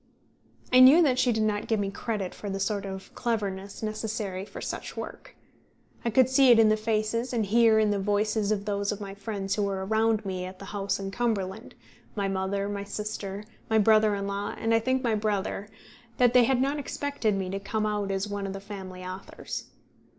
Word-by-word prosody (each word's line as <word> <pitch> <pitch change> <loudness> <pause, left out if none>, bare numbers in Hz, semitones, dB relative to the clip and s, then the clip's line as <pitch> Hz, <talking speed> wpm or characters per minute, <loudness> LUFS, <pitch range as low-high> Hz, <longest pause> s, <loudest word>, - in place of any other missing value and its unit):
I 255 - +8
knew 275 +7 +9
that 255 -4 +2
she 255 -1 +3
did 220 -1 +1
not 210 -1 -1
give 220 -2 +1
me 200 -1 -1
credit 200 -3 -3
for 205 - -7
the 195 0 -3
sort 200 0 -1
of 190 0 -8
cleverness 200 -4 -3
necessary 215 -3 -3
for - - -9
such - - -5
work. - - -8 0.7
I 235 - +1
could 250 +2 +5
see 260 0 +5
in 225 -2 +7
the 215 - +4
faces 220 +3 -1
and 225 -3 +1
hear 225 +1 +5
in 215 -1 +3
the 205 - 0
voices 210 +1 +1
of 205 -1 -1
those 200 -1 -1
of 210 - -4
my 200 -1 -6
friends 200 -1 -3
who 210 - 0
were 195 -1 -1
around 220 +1 +1
me 185 -1 -3
at 185 0 -8
the 195 - -10
house 200 0 -2
in 195 0 -4
Cumberland 215 -2 -2 0.4
my 200 -2 0
mother, 195 +1 -1
my 200 -1 -3
sister, 205 -1 -5 0.3
my 220 - +3
brother 215 0 +5
in 200 0 -3
law, 200 +1 -3
and, 225 0 0
I 225 - +5
think, 260 +3 0
my 235 -2 +1
brother 205 -1 -1 0.5
that 245 -1 +4
they 250 -1 +7
had 260 0 +2
not 280 +3 +1
expected 280 -6 -1
me 185 -1 -3
to 195 - -2
come 215 +2 -2
out 210 -1 -1
as 195 +1 -1
one 205 -1 -3
of 190 - -4
the 195 - -5
family 190 -2 -8
authors. 185 +1 -6
210 Hz, 210 wpm, -27 LUFS, 195-225 Hz, 0.7 s, knew